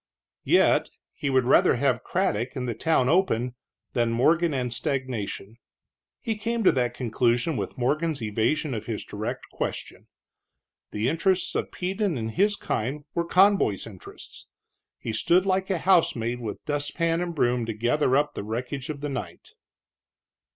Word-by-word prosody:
Yet - - +4 0.2
he 140 - -3
would 130 -1 +3
rather 125 - +5
have - - +1
Craddock, 115 +7 -1
and 125 -2 -3
the 120 - -1
town 160 0 +1
open, 125 -8 +2 0.4
than 120 -2 +1
Morgan 160 +8 +3
and 125 -4 -2
stagnation. 120 -7 -3 0.6
He 225 -2 -3
came 230 +2 -1
to - - +6
that 125 -2 0
conclusion 120 +4 +1
with 100 -5 -4
Morgan's 150 +4 0
evasion 115 +7 0
of 110 -2 -5
his 110 -3 -4
direct 105 +1 -5
question. - - -5 0.8
The 105 +3 -1
interests 180 +6 +1
of - - -2
Peden 190 -2 -1
and 110 -1 -3
his 205 - +2
kind 140 - -3
were 170 - 0
Conboy's 185 - +3
interests. 100 -5 -11 0.5
He 115 - -5
stood 175 - +3
like 190 0 0
a 190 - +1
housemaid 125 -10 +2
with 110 -4 -6
dustpan 165 +3 0
and 175 -1 -3
broom 120 -4 +1
to 115 - -2
gather 125 +4 +2
up 145 0 +1
the - - -5
wreckage 125 +6 -4
of 145 -2 -5
the 145 - -3
night. 135 - -6
135 Hz, 155 wpm, -26 LUFS, 115-170 Hz, 0.8 s, to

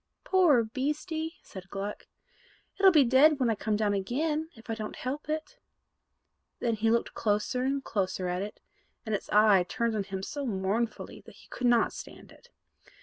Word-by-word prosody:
"Poor 340 -11 +4
beastie!" 300 +7 -3
said 190 -1 -11
Gluck: 200 +2 -5 0.7
"it'll 390 -1 +7
be 305 -5 +6
dead 270 +4 +5
when 245 -3 +2
I - - +2
come 215 0 -1
down 210 -1 +1
again, 300 +11 -1
if 225 - -16
I 225 - -2
don't 215 -1 -5
help 280 +4 -5
it." 315 +11 -4 1.0
Then 235 - 0
he 220 +1 +1
looked 235 +1 +1
closer 210 +4 0
and 270 +1 -1
closer 185 -2 -2
at 180 +1 -2
it, 205 +1 -6 0.5
and 220 - -3
its 205 - -3
eye 210 -2 +5
turned 235 +4 -1
on 205 -2 -1
him 190 -1 -5
so 285 +5 -4
mournfully 210 +3 -2
that - - -13
he - - -18
could 250 - -1
not 240 -1 +3
stand - - -11
it. 485 - -19
230 Hz, 180 wpm, -29 LUFS, 205-290 Hz, 1.0 s, it'll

